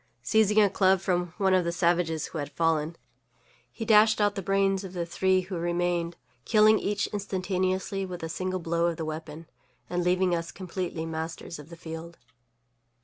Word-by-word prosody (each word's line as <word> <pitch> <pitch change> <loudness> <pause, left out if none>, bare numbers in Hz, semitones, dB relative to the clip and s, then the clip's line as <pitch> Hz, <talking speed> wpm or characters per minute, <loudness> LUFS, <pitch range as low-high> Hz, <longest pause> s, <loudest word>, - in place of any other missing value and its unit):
Seizing 215 - +3
a 210 - +6
club 190 -1 +3
from 180 -2 -1
one 195 -3 +2
of 185 -1 +4
the 170 - -1
savages 170 -2 +1
who 160 - -6
had 145 0 -4
fallen, 165 -1 +1 0.8
he 225 - -6
dashed 215 0 +5
out 205 -1 +3
the 200 - -4
brains 195 +1 +1
of 190 -1 -8
the 175 -2 -2
three 185 +2 +2
who 185 0 -6
remained, 175 0 -1 0.3
killing 215 - +5
each 205 0 -1
instantaneously 190 -1 -1
with 180 -3 -6
a - - -2
single 185 +3 -3
blow 170 0 0
of 170 -2 -2
the 160 - -3
weapon, 155 +1 -6 0.5
and 175 0 0
leaving 180 0 +2
us 170 0 -2
completely 180 -3 -4
masters 160 0 -5
of 150 +1 -12
the 170 - -10
field. 165 0 -8
180 Hz, 180 wpm, -27 LUFS, 165-195 Hz, 0.8 s, a